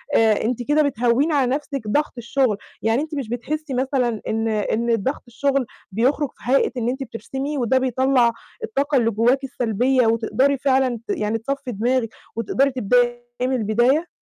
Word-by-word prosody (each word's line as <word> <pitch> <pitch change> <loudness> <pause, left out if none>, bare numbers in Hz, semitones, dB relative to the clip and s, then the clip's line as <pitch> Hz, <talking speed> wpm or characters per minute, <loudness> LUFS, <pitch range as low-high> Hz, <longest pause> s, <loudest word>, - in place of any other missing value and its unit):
آآ، 220 -2 +4
أنتِ 245 +2 -1
كده 295 +4 +2
بتهوّني 260 +3 +1
على 260 -4 +2
نفْسِك 275 -6 -5
ضغط 295 +8 0
الشغل، 240 -2 0 0.2
يعني 225 +5 +1
أنتِ 310 -1 -5
مش 260 -6 -4
بتحسّي 285 +4 -4
مثلًا 250 -3 0
إن 225 +1 -1
إن 225 +2 0
ضغط 260 +7 -3
الشغل 270 +2 0 0.3
بيُخرج 260 +7 +1
في 245 - -4
هيئة 275 - +3
إن 235 0 0
أنتِ 265 +2 -3
بترسمي، 270 +5 -5
وده 255 +1 +2
بيطلّع 260 -1 +2 0.3
الطاقة 285 -9 0
اللي 230 -2 +2
جواكِ 245 +6 +2
السلبية 250 0 +1
وتقدري 255 +5 +2
فعلًا 260 -3 +1
ت - - -32
يعني 215 +1 0
تصفي 275 +2 -4
دماغِك، 235 +2 0 0.3
وتقدري 265 +5 +1
تبدأي 245 0 +2 0.2
من 260 +1 +1
البداية؟ 240 +9 +2
250 Hz, 165 wpm, -22 LUFS, 230-275 Hz, 0.3 s, آآ